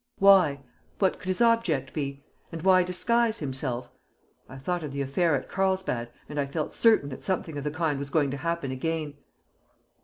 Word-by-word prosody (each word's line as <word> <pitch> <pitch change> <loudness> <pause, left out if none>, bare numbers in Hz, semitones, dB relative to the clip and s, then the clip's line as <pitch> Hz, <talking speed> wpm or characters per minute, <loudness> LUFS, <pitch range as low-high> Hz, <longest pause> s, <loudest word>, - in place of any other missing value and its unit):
Why? 185 -8 +5 0.4
What 190 -2 +1
could - - -11
his 185 +4 -1
object 210 - +2
be? 140 -2 -4 0.3
And 165 -1 -6
why 185 -1 +6
disguise 220 +6 +1
himself? 130 -3 -4 0.6
I 130 - -9
thought 175 +6 -2
of 150 -3 -5
the 140 - -2
affair 145 +4 +1
at 130 - -3
Carlsbad, 190 -11 -1 0.2
and 150 - -4
I 140 - 0
felt 150 +2 -3
certain 220 -11 +4
that 130 - -8
something 180 -4 -2
of 145 - -4
the 150 - -1
kind 160 -2 -1
was 140 0 -5
going 145 -2 +1
to 140 - -3
happen 165 -3 -2
again!" 155 +2 -2
155 Hz, 185 wpm, -27 LUFS, 140-185 Hz, 0.6 s, why